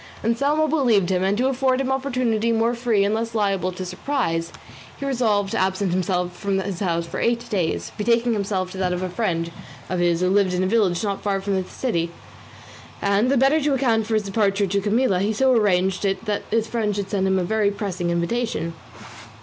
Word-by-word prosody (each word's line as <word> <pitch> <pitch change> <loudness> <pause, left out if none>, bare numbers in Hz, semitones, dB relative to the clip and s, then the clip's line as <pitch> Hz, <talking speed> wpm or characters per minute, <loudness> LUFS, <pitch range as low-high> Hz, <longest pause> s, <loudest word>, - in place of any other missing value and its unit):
Anselmo 280 +7 +1
believed 240 - +2
him, 185 0 +1
and 195 +2 +1
to 255 +3 +2
afford 265 -1 +1
him 270 - 0
an - - +2
opportunity 250 -4 0
more 230 +1 +2
free 235 -4 +1
and 205 - +1
less 230 +1 -2
liable 195 -4 0
to 185 +1 -6
surprise, 175 -7 -2 0.5
he 280 - -5
resolved 220 -7 +1
to - - 0
absent 190 0 0
himself 180 -1 -1
from 195 +1 -1
his 190 -2 -3
house 170 -4 -1
for 165 - -5
eight 235 0 0
days, 180 -6 -1
betaking 235 +2 +2
himself 195 -3 -2
to 190 - -7
that 180 -1 0
of 180 +1 -3
a 185 - -2
friend 170 -4 -1 0.4
of 180 - 0
his 175 -1 +2
who 185 - +2
lived 195 -2 +2
in 180 - +1
a - - +1
village 190 -4 +1
not 200 -2 -2
far 200 -1 0
from 200 +1 -2
the 190 -1 0
city; 170 -10 -1 0.9
and, 200 +4 +2
the 275 - +3
better 275 +5 +4
to 290 -1 +1
account 230 -5 +1
for 220 - 0
his 215 - +1
departure 200 0 +1
to 200 +1 0
Camilla, 205 -1 +2
he 200 +3 +1
so 260 +5 +2
arranged 190 -5 +2
it 195 +1 -1
that 210 -2 -3
the 225 0 +2
friend 220 -2 -2
should 200 -1 -4
send 190 -2 +1
him 190 0 +2
a 185 - +1
very 215 +2 +1
pressing 195 -4 -3
invitation. 170 0 -1
205 Hz, 215 wpm, -22 LUFS, 185-235 Hz, 0.9 s, better